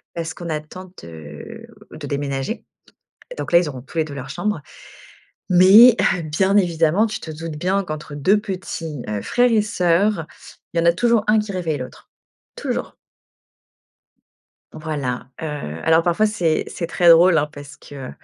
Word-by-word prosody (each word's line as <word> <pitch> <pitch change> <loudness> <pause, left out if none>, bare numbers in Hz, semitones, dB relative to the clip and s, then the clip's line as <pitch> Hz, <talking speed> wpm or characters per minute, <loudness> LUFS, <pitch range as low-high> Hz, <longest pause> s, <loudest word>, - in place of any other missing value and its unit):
parce 165 -1 -4
qu'on 170 -1 -8
attend 160 +4 -6
de 80 -3 -10 0.2
de - - -8
déménager 140 - -3 0.7
et - - -7
donc - - -5
là, 170 - +8
ils 175 - 0
auront 130 -3 -7
tous 140 - -16
les 160 - +2
2 150 - -9
leur 135 -1 -7
chambre. 210 -2 -2 0.9
Mais 200 +7 +8 0.2
hum, 165 -3 -6
bien 190 +6 +2
évidemment, 170 +2 +2
tu 220 - -4
te 160 - -7
doutes 160 0 -7
bien 185 +5 0
qu'entre 155 -2 -7
2 185 +9 +3
petits 170 - -6
heu, 105 -1 -3
frère 245 0 +2
et 220 -2 +4
sœur, 180 -2 +1 0.5
il 170 - +1
y 165 - +1
en - - -1
a 170 - +6
toujours 235 0 +2
un 215 0 +4
qui 210 -1 -4
réveille 165 -5 -2
l'autre, 125 0 -10 0.5
toujours. - - -4 1.8
Voilà, 145 -7 -4
heu, 160 - -3 0.4
alors 160 0 +4
parfois, 175 +5 +1
c'est 175 -7 0
c'est 170 - -5
très 175 0 +3
drôle 165 +1 +7
hein, 150 - +1
parce 145 0 -11
que 135 -3 -10
165 Hz, 170 wpm, -20 LUFS, 150-190 Hz, 1.8 s, là